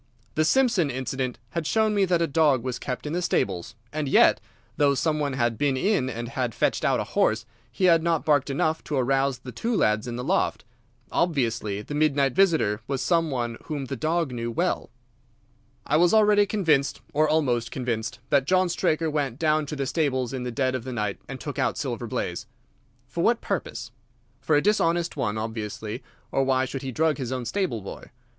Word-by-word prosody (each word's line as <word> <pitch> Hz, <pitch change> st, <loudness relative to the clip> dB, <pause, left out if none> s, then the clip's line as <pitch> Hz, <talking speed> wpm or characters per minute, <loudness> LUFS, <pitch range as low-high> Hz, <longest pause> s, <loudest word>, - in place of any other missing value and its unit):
The 155 Hz, -, +2 dB
Simpson 230 Hz, -, +3 dB
incident 130 Hz, 0 st, -3 dB
had 160 Hz, +2 st, -2 dB
shown 220 Hz, -1 st, +2 dB
me 200 Hz, -2 st, +3 dB
that 175 Hz, -2 st, +2 dB
a -, -, +3 dB
dog 145 Hz, -5 st, +2 dB
was 130 Hz, -1 st, -3 dB
kept 125 Hz, +1 st, -5 dB
in 150 Hz, -, -3 dB
the 175 Hz, -, 0 dB
stables, 105 Hz, -, -1 dB, 0.2 s
and 155 Hz, -1 st, -2 dB
yet, -, -, +5 dB, 0.3 s
though 140 Hz, -1 st, +3 dB
some 155 Hz, +3 st, 0 dB
one 145 Hz, -2 st, -1 dB
had 120 Hz, -3 st, 0 dB
been 140 Hz, -2 st, +1 dB
in 140 Hz, -4 st, +1 dB
and 120 Hz, -1 st, -5 dB
had 125 Hz, -2 st, -2 dB
fetched -, -, +1 dB
out -, -, +2 dB
a -, -, 0 dB
horse, 110 Hz, +1 st, +1 dB, 0.3 s
he 155 Hz, -, -4 dB
had 165 Hz, -2 st, +5 dB
not 165 Hz, -1 st, 0 dB
barked 145 Hz, -2 st, +3 dB
enough 155 Hz, +3 st, 0 dB
to 150 Hz, -, -3 dB
arouse 135 Hz, 0 st, +1 dB
the 125 Hz, 0 st, -9 dB
two 230 Hz, -, -2 dB
lads 110 Hz, -, +2 dB
in 120 Hz, -, -4 dB
the 125 Hz, -, -4 dB
loft. 185 Hz, +8 st, 0 dB, 0.5 s
Obviously 115 Hz, -, 0 dB
the 145 Hz, -, -7 dB
midnight 145 Hz, -3 st, +2 dB
visitor 160 Hz, -, +2 dB
was 135 Hz, -1 st, -1 dB
some 165 Hz, -2 st, +2 dB
one 120 Hz, -4 st, -2 dB
whom 145 Hz, -3 st, -4 dB
the 135 Hz, -, -4 dB
dog 160 Hz, +3 st, 0 dB
knew 120 Hz, -1 st, -3 dB
well. 175 Hz, +10 st, -1 dB, 1.0 s
"I 150 Hz, -, +2 dB
was 175 Hz, +5 st, +4 dB
already 210 Hz, -1 st, +5 dB
convinced, 160 Hz, -10 st, +1 dB
or 155 Hz, +1 st, +3 dB
almost 125 Hz, -7 st, +1 dB
convinced, 115 Hz, -3 st, -3 dB
that 140 Hz, -2 st, +4 dB
John 185 Hz, +1 st, +3 dB
Straker 165 Hz, -1 st, +1 dB
went 145 Hz, -5 st, -1 dB
down 155 Hz, -1 st, +1 dB
to 150 Hz, -, -4 dB
the 140 Hz, -1 st, -2 dB
stables 130 Hz, -4 st, 0 dB
in 130 Hz, -, -3 dB
the 125 Hz, -, -3 dB
dead 130 Hz, +1 st, 0 dB
of 130 Hz, -3 st, -3 dB
the 130 Hz, 0 st, -5 dB
night 105 Hz, -4 st, -2 dB
and -, -, -7 dB
took -, -, -5 dB
out -, -, 0 dB
Silver -, -, -3 dB
Blaze. -, -, -3 dB, 0.6 s
For -, -, -3 dB
what -, -, +3 dB
purpose? -, -, -4 dB, 0.5 s
For 150 Hz, +3 st, +1 dB
a 145 Hz, -, +3 dB
dishonest 175 Hz, -5 st, +1 dB
one, 105 Hz, -2 st, -1 dB
obviously, 110 Hz, +1 st, -4 dB, 0.3 s
or 135 Hz, -, +2 dB
why 130 Hz, -1 st, +2 dB
should 135 Hz, +1 st, -5 dB
he 135 Hz, -, -4 dB
drug 155 Hz, +2 st, +1 dB
his 130 Hz, -2 st, -3 dB
own 130 Hz, -2 st, -3 dB
stable 145 Hz, -, -1 dB
boy? -, -, -8 dB
140 Hz, 205 wpm, -25 LUFS, 125-160 Hz, 1.0 s, yet